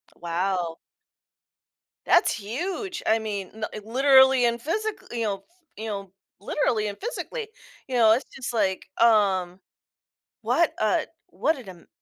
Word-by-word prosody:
Wow. 175 Hz, 0 st, -2 dB, 1.3 s
That's -, -, +4 dB
huge! 350 Hz, -, -4 dB
I 220 Hz, +1 st, +4 dB
mean, 205 Hz, -4 st, -4 dB
nuh 215 Hz, 0 st, -4 dB, 0.2 s
literally 265 Hz, +1 st, +5 dB
and 235 Hz, 0 st, 0 dB
physic 430 Hz, -, -1 dB, 0.2 s
you 235 Hz, -1 st, -2 dB
know 195 Hz, -2 st, -2 dB, 0.3 s
you 220 Hz, +1 st, -5 dB
know, 195 Hz, -3 st, -5 dB, 0.3 s
literally 215 Hz, 0 st, 0 dB
and 200 Hz, -, -5 dB
physically. 470 Hz, 0 st, -5 dB, 0.4 s
You 260 Hz, -, -3 dB
know, 225 Hz, -2 st, +6 dB
it's 245 Hz, +5 st, +2 dB
just 250 Hz, -2 st, -5 dB
like, 195 Hz, -4 st, 0 dB, 0.2 s
um, 195 Hz, -5 st, +3 dB, 0.8 s
what -, -, +2 dB
a -, -, +1 dB, 0.2 s
what 320 Hz, -, 0 dB
an, 190 Hz, -9 st, -12 dB
220 Hz, 130 wpm, -25 LUFS, 195-265 Hz, 1.3 s, know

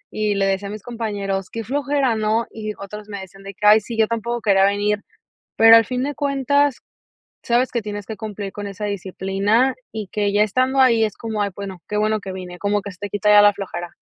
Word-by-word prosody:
y 210 Hz, -1 st, 0 dB
le 195 Hz, 0 st, +1 dB
decía 195 Hz, +1 st, -1 dB
a -, -, -6 dB
mis 215 Hz, -2 st, -8 dB
compañeros: 205 Hz, -5 st, -3 dB
"Qué 230 Hz, -, -5 dB
flojera, 275 Hz, 0 st, 0 dB
¿no?", 220 Hz, +2 st, 0 dB
y 215 Hz, -1 st, -5 dB
otros 210 Hz, +1 st, -9 dB
me 200 Hz, -, -5 dB
decían 195 Hz, +1 st, -12 dB
de 195 Hz, 0 st, -8 dB
que: 210 Hz, -, -4 dB
"Ay 210 Hz, +1 st, +8 dB
sí, 230 Hz, +2 st, -7 dB
yo 220 Hz, -1 st, +3 dB
tampoco 235 Hz, +1 st, -3 dB
quería 195 Hz, -3 st, +4 dB
venir", 205 Hz, +1 st, 0 dB, 0.5 s
pero, 225 Hz, 0 st, +9 dB
al 225 Hz, -, +5 dB
fin 250 Hz, +2 st, -3 dB
de 290 Hz, +1 st, -2 dB
cuentas, 280 Hz, 0 st, +1 dB, 0.6 s
sabes 245 Hz, +2 st, +1 dB
que 235 Hz, -, -1 dB
tienes 205 Hz, -1 st, -6 dB
que 220 Hz, -, -7 dB
cumplir 210 Hz, -3 st, -6 dB
con 205 Hz, 0 st, -6 dB
esa 200 Hz, +1 st, -5 dB
disciplina 200 Hz, +5 st, 0 dB, 0.2 s
y 215 Hz, -2 st, -5 dB
que 205 Hz, -1 st, 0 dB
ya 210 Hz, +1 st, +4 dB
estando 255 Hz, +5 st, +1 dB
ahí 230 Hz, -3 st, +5 dB
es 210 Hz, -, -5 dB
como: 220 Hz, -2 st, -3 dB
"Ay 200 Hz, -, 0 dB
bueno, 195 Hz, -3 st, -7 dB
qué 210 Hz, -, -2 dB
bueno 215 Hz, +1 st, +1 dB
que 195 Hz, -2 st, -7 dB
vine 180 Hz, -1 st, -8 dB
como 205 Hz, 0 st, 0 dB
que 200 Hz, -, -7 dB
se 185 Hz, -, -16 dB
te 205 Hz, 0 st, -5 dB
quita 205 Hz, +1 st, 0 dB
ya 210 Hz, 0 st, +8 dB
la 205 Hz, 0 st, +6 dB
flojera". 190 Hz, -3 st, -6 dB
210 Hz, 235 wpm, -21 LUFS, 200-230 Hz, 0.6 s, pero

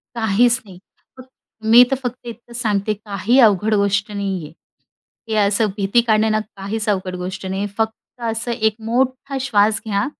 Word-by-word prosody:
काहीच 235 Hz, +3 st, +2 dB
नाही. 190 Hz, -4 st, -13 dB, 0.4 s
फ 255 Hz, -, -9 dB, 0.5 s
मी 240 Hz, +2 st, +9 dB
तर 270 Hz, -, +1 dB
फक्त 245 Hz, 0 st, -5 dB
इतकंच 235 Hz, 0 st, -9 dB
सांगते, 210 Hz, -1 st, 0 dB
काही 210 Hz, +4 st, 0 dB
अवघड 215 Hz, -1 st, +4 dB
गोष्ट 200 Hz, +1 st, +1 dB
नाहीये. 190 Hz, -6 st, -4 dB, 0.8 s
हे 220 Hz, -, -2 dB
असं 210 Hz, +2 st, +2 dB
भीती 200 Hz, +3 st, +2 dB
काढणे 220 Hz, -1 st, +3 dB
ना 215 Hz, 0 st, +1 dB, 0.2 s
काहीच 210 Hz, +3 st, -4 dB
अवघड 185 Hz, -2 st, -1 dB
गोष्ट 185 Hz, +1 st, -6 dB
नाहीये. 190 Hz, +2 st, -2 dB
फक्त 225 Hz, +2 st, -4 dB
असं 225 Hz, +2 st, -3 dB
एक 220 Hz, -2 st, +1 dB
मोठा 260 Hz, +3 st, -1 dB
श्वास 220 Hz, -4 st, +2 dB
घ्या. 200 Hz, -1 st, 0 dB
215 Hz, 160 wpm, -20 LUFS, 200-235 Hz, 0.8 s, मी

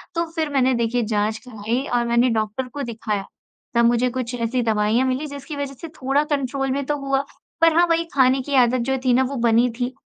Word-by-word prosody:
तो 335 Hz, -, +1 dB
फिर 320 Hz, -2 st, -1 dB
मैंने 260 Hz, -1 st, +3 dB
देखिए 235 Hz, +1 st, 0 dB
जाँच 210 Hz, +1 st, 0 dB
कराई 225 Hz, +2 st, -2 dB
और 240 Hz, 0 st, +2 dB
मैंने 235 Hz, +2 st, +3 dB
डॉक्टर 220 Hz, +3 st, -1 dB
को 280 Hz, +3 st, -6 dB
दिखाया। 220 Hz, -4 st, -3 dB, 0.5 s
तब 235 Hz, 0 st, +4 dB
मुझे 240 Hz, +1 st, +3 dB
कुछ 250 Hz, -1 st, -4 dB
ऐसी 240 Hz, +1 st, -1 dB
दवाइयाँ 220 Hz, +3 st, +2 dB
मिली 260 Hz, +4 st, -1 dB
जिसकी 285 Hz, +2 st, -8 dB
वज़ह 285 Hz, -1 st, -4 dB
से 330 Hz, -, -6 dB
थोड़ा 270 Hz, +3 st, +2 dB
कंट्रोल 270 Hz, -1 st, -1 dB
में 280 Hz, +1 st, -1 dB
तो 295 Hz, +1 st, -1 dB
हुआ। 275 Hz, -1 st, 0 dB, 0.4 s
पर 330 Hz, -1 st, +6 dB
हाँ, 345 Hz, -, +6 dB
वही 335 Hz, 0 st, +1 dB
खाने 265 Hz, -1 st, +4 dB
की 280 Hz, +2 st, -3 dB
आदत 250 Hz, -1 st, +4 dB
जो 265 Hz, -, +1 dB
थी 250 Hz, -, +4 dB
ना 260 Hz, +2 st, +4 dB
वो 270 Hz, +2 st, -3 dB
बनी 235 Hz, +2 st, +4 dB
थी 250 Hz, +1 st, -1 dB
255 Hz, 220 wpm, -22 LUFS, 235-275 Hz, 0.5 s, पर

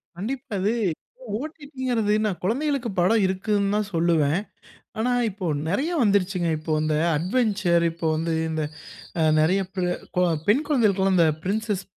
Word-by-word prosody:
கண்டிப்பா 230 Hz, +5 st, -5 dB
அது 205 Hz, +4 st, +1 dB, 0.6 s
ஒ.டி.டி.ங்குறது 260 Hz, -6 st, -2 dB
நான் 195 Hz, -4 st, -1 dB
குழந்தைகளுக்கு 265 Hz, +3 st, 0 dB
படம் 200 Hz, +5 st, +3 dB
இருக்குதுன்னு 200 Hz, +1 st, 0 dB
தான் 210 Hz, -1 st, 0 dB
சொல்லுவேன். 165 Hz, -1 st, +2 dB, 0.6 s
ஆனா, 245 Hz, +3 st, +1 dB, 0.2 s
இப்போ 190 Hz, -1 st, -6 dB, 0.2 s
நிறைய 280 Hz, -, 0 dB
வந்துருச்சுங்க. 195 Hz, -4 st, +2 dB
இப்போ 155 Hz, +1 st, -3 dB
இந்த 155 Hz, 0 st, +1 dB, 0.2 s
அட்வென்ச்சர், 195 Hz, -2 st, +1 dB
இப்போ 165 Hz, 0 st, -3 dB
வந்து 165 Hz, +1 st, -1 dB, 0.2 s
இந்த 155 Hz, -1 st, -1 dB, 0.6 s
அ -, -, +4 dB, 0.2 s
நிறைய 185 Hz, +5 st, +3 dB
ப் 190 Hz, -, -3 dB
ர -, -, 0 dB, 0.3 s
கோ -, -, +4 dB, 0.3 s
பெண் 250 Hz, +9 st, +4 dB
கொழந்தைகளுக்கு 215 Hz, -10 st, +2 dB
எல்லாம் 190 Hz, -1 st, +3 dB
இந்த 165 Hz, -2 st, +5 dB, 0.2 s
பிரின்சஸ் 205 Hz, 0 st, -1 dB
200 Hz, 145 wpm, -24 LUFS, 175-230 Hz, 0.6 s, இந்த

